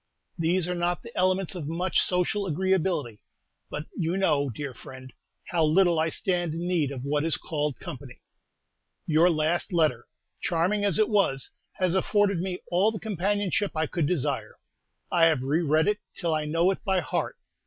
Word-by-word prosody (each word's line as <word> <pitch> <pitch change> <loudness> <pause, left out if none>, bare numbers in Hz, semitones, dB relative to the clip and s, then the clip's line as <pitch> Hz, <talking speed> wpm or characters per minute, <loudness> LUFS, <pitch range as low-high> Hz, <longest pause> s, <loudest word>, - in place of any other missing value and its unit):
These 170 +2 +1
are 180 - -1
not 175 0 -1
the 235 - -11
elements 185 0 +1
of 170 -6 -5
much 175 +4 +1
social 190 +3 0
agreeability; 170 - 0 0.5
but 150 +1 -5
you 170 +2 -1
know, 145 -7 +2
dear 140 +3 -5
friend, 130 +1 -11 0.4
how 170 -3 +2
little 170 +1 +4
I 160 +1 +2
stand 175 -2 -1
in 170 +1 -3
need 170 -6 +1
of 130 -2 -6
what 145 +1 0
is 165 -3 +3
called 150 -4 -3
company. 130 -1 -9 0.9
Your 165 +3 +4
last 160 +2 0
letter, 155 -9 +1 0.3
charming 185 +4 +1
as 200 -5 +2
it 215 - +4
was, 195 - +1 0.2
has 185 -2 0
afforded 200 0 +2
me 180 0 -3
all 190 +5 +3
the 215 - -6
companionship 205 -1 -1
I 160 - +2
could 160 -1 -1
desire. 140 -9 -2 0.5
I 170 -2 +5
have 155 -6 +2
re 145 +5 +1
read 155 +1 +2
it 210 0 +1 0.2
till 170 -3 -1
I 155 -1 0
know 165 +5 +2
it 195 - -5
by 190 -3 +2
heart. - - -2
170 Hz, 175 wpm, -27 LUFS, 150-185 Hz, 0.9 s, I